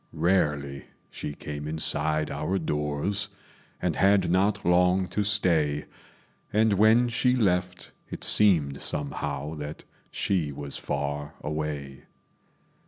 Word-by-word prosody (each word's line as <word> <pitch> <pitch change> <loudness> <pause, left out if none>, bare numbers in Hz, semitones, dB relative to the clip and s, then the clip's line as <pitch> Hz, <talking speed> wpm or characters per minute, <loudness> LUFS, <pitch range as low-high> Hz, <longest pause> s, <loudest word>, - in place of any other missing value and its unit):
Rarely 75 -6 0 0.3
she 75 - -6
came 75 0 -6
inside 75 0 0
our 95 - -1
doors, 80 +6 -2 0.5
And - - -1
had 95 -3 +3
not 95 +3 +1
long 90 +1 +3
to 105 +4 -1
stay; 85 -8 +2 0.7
And 110 0 +3
when 110 +5 +5
she 125 +1 +2
left, 90 -5 0 0.2
it - - -7
seemed 80 -10 +4
somehow 75 0 -2
That 75 +1 -7 0.3
she 85 -7 0
was 70 0 -6
far 75 +2 -4
away. 75 -3 -4
80 Hz, 110 wpm, -26 LUFS, 75-95 Hz, 0.7 s, when